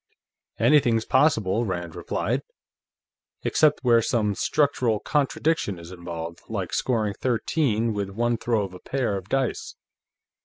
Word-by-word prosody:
"Anything's 120 Hz, -7 st, +3 dB
possible," 115 Hz, -7 st, +2 dB
Rand 85 Hz, -5 st, -4 dB
replied, -, -, -2 dB, 1.0 s
"except 150 Hz, -2 st, +3 dB
where 120 Hz, -2 st, +5 dB
some 105 Hz, -2 st, +1 dB
structural 125 Hz, -2 st, +1 dB
contradiction 145 Hz, -, 0 dB
is 85 Hz, +1 st, -11 dB
involved, 85 Hz, -2 st, -7 dB
like -, -, -3 dB
scoring 110 Hz, -5 st, 0 dB
thirteen 115 Hz, -1 st, 0 dB
with 100 Hz, -1 st, -3 dB
one 120 Hz, +4 st, 0 dB
throw 115 Hz, -2 st, 0 dB
of 95 Hz, -2 st, -6 dB
a 90 Hz, -, -10 dB
pair 130 Hz, -7 st, -1 dB
of 95 Hz, 0 st, -6 dB
dice. 135 Hz, -2 st, -1 dB
115 Hz, 125 wpm, -25 LUFS, 95-130 Hz, 1.0 s, where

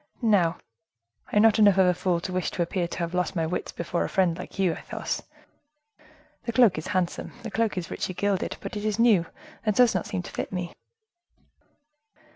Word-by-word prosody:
Now, 185 Hz, -7 st, +3 dB, 0.7 s
I -, -, -4 dB
am 210 Hz, -, +6 dB
not 225 Hz, 0 st, +5 dB
enough 205 Hz, -3 st, +6 dB
of 190 Hz, -, +6 dB
a 180 Hz, -, +4 dB
fool 175 Hz, -1 st, 0 dB
to 185 Hz, -, -5 dB
wish 185 Hz, 0 st, 0 dB
to 175 Hz, -, -1 dB
appear 175 Hz, +1 st, -2 dB
to -, -, -7 dB
have 170 Hz, 0 st, -3 dB
lost 180 Hz, +1 st, -1 dB
my 165 Hz, -2 st, +1 dB
wits 175 Hz, +3 st, -3 dB
before 170 Hz, 0 st, -2 dB
a -, -, -3 dB
friend 185 Hz, -3 st, +2 dB
like -, -, -9 dB
you, 190 Hz, -3 st, +2 dB
Athos. -, -, -4 dB, 1.2 s
The 235 Hz, -, -1 dB
cloak 225 Hz, -8 st, +4 dB
is 155 Hz, -, -7 dB
handsome, 185 Hz, -2 st, -2 dB
the 225 Hz, -, -5 dB
cloak 225 Hz, -3 st, 0 dB
is 180 Hz, -, -4 dB
richly 185 Hz, -, -3 dB
gilded, 200 Hz, 0 st, -1 dB
but -, -, -6 dB
it 205 Hz, -, -4 dB
is 215 Hz, -1 st, 0 dB
new, 220 Hz, -8 st, +4 dB, 0.4 s
and 215 Hz, -2 st, +1 dB
does 245 Hz, 0 st, +5 dB
not -, -, -2 dB
seem 200 Hz, -4 st, -3 dB
to -, -, -9 dB
fit -, -, -4 dB
me." 180 Hz, -2 st, -4 dB
185 Hz, 210 wpm, -26 LUFS, 175-210 Hz, 1.2 s, am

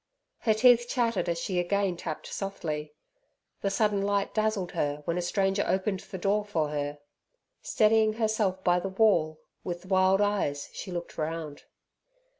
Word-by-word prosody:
Her 220 Hz, -2 st, +2 dB
teeth 240 Hz, +1 st, +5 dB
chattered 230 Hz, -7 st, 0 dB
as 170 Hz, -, 0 dB
she 180 Hz, +1 st, -1 dB
again 195 Hz, +1 st, 0 dB
tapped 160 Hz, -2 st, -6 dB
softly. 155 Hz, -6 st, -4 dB, 0.7 s
The 200 Hz, -, 0 dB
sudden 205 Hz, 0 st, +1 dB
light 200 Hz, 0 st, 0 dB
dazzled 215 Hz, -4 st, 0 dB
her 145 Hz, 0 st, -2 dB
when 170 Hz, -, -1 dB
a 180 Hz, -, 0 dB
stranger 195 Hz, +2 st, +1 dB
opened 190 Hz, 0 st, 0 dB
the 190 Hz, -, -8 dB
door 200 Hz, +3 st, +1 dB
for 165 Hz, -7 st, -1 dB
her. 145 Hz, 0 st, -3 dB, 0.6 s
Steadying 220 Hz, -, +3 dB
herself 215 Hz, -4 st, 0 dB
by 175 Hz, 0 st, +3 dB
the 195 Hz, -, -4 dB
wall, 185 Hz, -7 st, +2 dB, 0.2 s
with 175 Hz, 0 st, -5 dB
wild 190 Hz, 0 st, +3 dB
eyes 200 Hz, -9 st, 0 dB
she 185 Hz, -, -7 dB
looked 175 Hz, -1 st, -6 dB
around. 155 Hz, -2 st, -4 dB
190 Hz, 155 wpm, -28 LUFS, 170-210 Hz, 0.7 s, teeth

